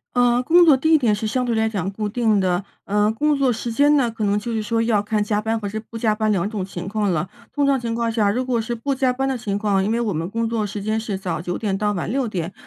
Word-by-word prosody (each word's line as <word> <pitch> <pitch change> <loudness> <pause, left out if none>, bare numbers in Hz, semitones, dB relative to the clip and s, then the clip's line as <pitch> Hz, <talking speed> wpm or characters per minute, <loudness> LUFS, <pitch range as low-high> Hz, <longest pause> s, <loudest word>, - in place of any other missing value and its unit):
呃， 245 0 +3
工 345 +6 +6
作 305 -6 +6
地 315 +4 +3
点 245 -8 +3
是 215 - -4
相 250 +4 0
对 235 -2 -1
来 220 0 +2
讲 195 -4 -2
固 210 +1 -3
定 220 -1 +1
的， 185 0 0 0.2
呃， 210 +1 +2
工 295 +7 +1
作 275 -2 +2
时 230 0 -3
间 290 +4 +4
呢？ 245 -4 +1
可 225 -1 -5
能 205 0 +2
就 220 +3 -4
是 220 - -1
说 225 +2 -1
要 225 -2 +2
看 210 0 0
加 210 0 0
班 225 +1 -1
或 205 - -4
者 215 +2 -4
不 230 - -7
加 220 -1 +1
班 215 0 0
两 195 -1 +1
种 210 -3 -3
情 185 -1 -7
况 205 -1 0
了。 160 +1 -1 0.2
通 285 -1 0
常 275 -1 +2
情 230 -1 -3
况 230 0 0
下， 215 -3 +2
如 250 +5 -1
果 245 -3 0
是 235 +2 -3
不 275 +5 -2
加 260 -1 +1
班 270 +2 -1
的 265 - 0
情 205 -4 -3
况， 205 -2 +1
因 210 - 0
为 235 - +1
我 225 -4 -1
们 165 +2 -3
工 230 +2 -1
作 225 -2 -1
时 205 0 -6
间 215 +1 0
是 210 -3 -3
早 175 -5 -3
9 175 +1 -3
点 205 -3 -1
到 210 +1 0
晚 175 - -3
6 260 -1 0
点， 175 -5 -4
220 Hz, 315 characters per minute, -21 LUFS, 205-240 Hz, 0.2 s, 工